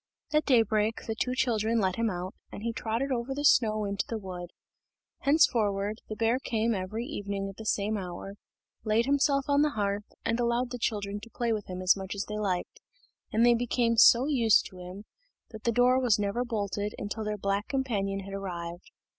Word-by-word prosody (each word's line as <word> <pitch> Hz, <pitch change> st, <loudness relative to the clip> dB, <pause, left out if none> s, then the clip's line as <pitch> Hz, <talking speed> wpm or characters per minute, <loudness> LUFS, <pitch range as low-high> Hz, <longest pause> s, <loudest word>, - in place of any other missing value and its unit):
At 305 Hz, 0 st, +3 dB
daybreak 225 Hz, -4 st, +2 dB
the 225 Hz, -, -2 dB
two 250 Hz, +3 st, -2 dB
children 230 Hz, -2 st, +1 dB
let 190 Hz, -3 st, +1 dB
him 230 Hz, -1 st, +1 dB
out, 185 Hz, 0 st, -4 dB, 0.2 s
and 205 Hz, -, -8 dB
he 230 Hz, 0 st, -1 dB
trotted 230 Hz, +5 st, -2 dB
over 255 Hz, +2 st, -2 dB
the 290 Hz, +1 st, -2 dB
snow 215 Hz, -6 st, +4 dB
into 200 Hz, -1 st, -1 dB
the 230 Hz, -, -2 dB
wood. 180 Hz, -4 st, -7 dB, 0.7 s
Henceforward, 215 Hz, -8 st, +2 dB
the 215 Hz, -, -4 dB
bear 230 Hz, +3 st, +1 dB
came 230 Hz, -3 st, 0 dB
every 210 Hz, +4 st, -3 dB
evening 200 Hz, -8 st, -4 dB
at 195 Hz, -, -9 dB
the 220 Hz, -, -7 dB
same 210 Hz, +1 st, 0 dB
hour, 185 Hz, +1 st, -7 dB, 0.5 s
laid 220 Hz, +1 st, +2 dB
himself 275 Hz, 0 st, +2 dB
on 285 Hz, 0 st, +3 dB
the 300 Hz, -, +3 dB
hearth, 205 Hz, 0 st, -2 dB
and 230 Hz, +1 st, 0 dB
allowed 240 Hz, +1 st, 0 dB
the 245 Hz, -, -5 dB
children 205 Hz, -3 st, -2 dB
to 220 Hz, +3 st, -12 dB
play 235 Hz, 0 st, -1 dB
with 210 Hz, -2 st, -4 dB
him 185 Hz, 0 st, -5 dB
as 185 Hz, -, +5 dB
much 195 Hz, 0 st, -5 dB
as 200 Hz, -, -3 dB
they 210 Hz, 0 st, -4 dB
liked; 185 Hz, -4 st, -2 dB, 0.5 s
and 225 Hz, +2 st, +3 dB
they 240 Hz, -, +6 dB
became 235 Hz, 0 st, +1 dB
so 235 Hz, +2 st, +7 dB
used 240 Hz, -7 st, +4 dB
to 185 Hz, -, -12 dB
him, 180 Hz, +3 st, -9 dB, 0.5 s
that 220 Hz, -2 st, -10 dB
the 235 Hz, -, +3 dB
door 250 Hz, +2 st, +4 dB
was 245 Hz, -5 st, +3 dB
never 205 Hz, +4 st, -1 dB
bolted 205 Hz, -3 st, -3 dB
until 210 Hz, +2 st, -4 dB
their 210 Hz, 0 st, -2 dB
black 200 Hz, +1 st, -1 dB
companion 205 Hz, -8 st, -1 dB
had 195 Hz, 0 st, -9 dB
arrived. 175 Hz, -3 st, -6 dB
215 Hz, 200 wpm, -29 LUFS, 200-240 Hz, 0.7 s, so